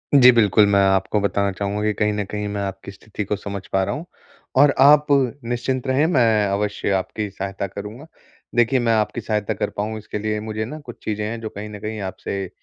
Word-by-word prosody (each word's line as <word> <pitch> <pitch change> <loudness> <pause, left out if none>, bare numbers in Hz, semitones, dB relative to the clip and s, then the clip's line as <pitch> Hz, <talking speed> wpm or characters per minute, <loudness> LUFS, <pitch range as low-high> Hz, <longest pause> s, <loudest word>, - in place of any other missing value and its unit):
जी, 125 -2 +9
बिल्कुल। 105 -3 +4
मैं 100 -1 +3
आपको 95 +2 +2
बताना 100 0 +1
चाहूँगा 100 +2 -3
कि 105 - +2
कहीं 105 0 +2
न 105 0 -1
कहीं 105 0 -3
मैं 100 - -2
आपकी 95 0 -5
स्थिति 105 +1 -7
को 105 - -1
समझ 100 0 -6
पा 95 - +3
रहा 100 +5 -2
हूँ। 160 - -6 0.5
और 145 -1 +6
आप 145 +2 +7
निश्चिंत 130 -1 0
रहें, 130 +4 +3
मैं 115 - +3
अवश्य 100 +1 -1
आपकी 100 +2 -2
सहायता 95 0 -4
करूँगा। 105 - -8 0.5
देखिए 120 +2 +3
मैं 115 -1 +2
आपकी 110 +2 0
सहायता 105 -2 -1
कर - - -2
पाऊँ 110 +2 -2
इसके 105 0 -6
लिए 105 0 -1
मुझे 110 0 -4
ना 155 +6 -7
कुछ 125 -5 -11
चीज़ें 105 -1 -2
हैं 115 +2 -4
जो 110 - -4
कहीं 105 +1 -7
न 105 -1 -8
कहीं 110 +1 -5
आपसे 95 -2 -5
105 Hz, 215 wpm, -22 LUFS, 100-120 Hz, 0.5 s, जी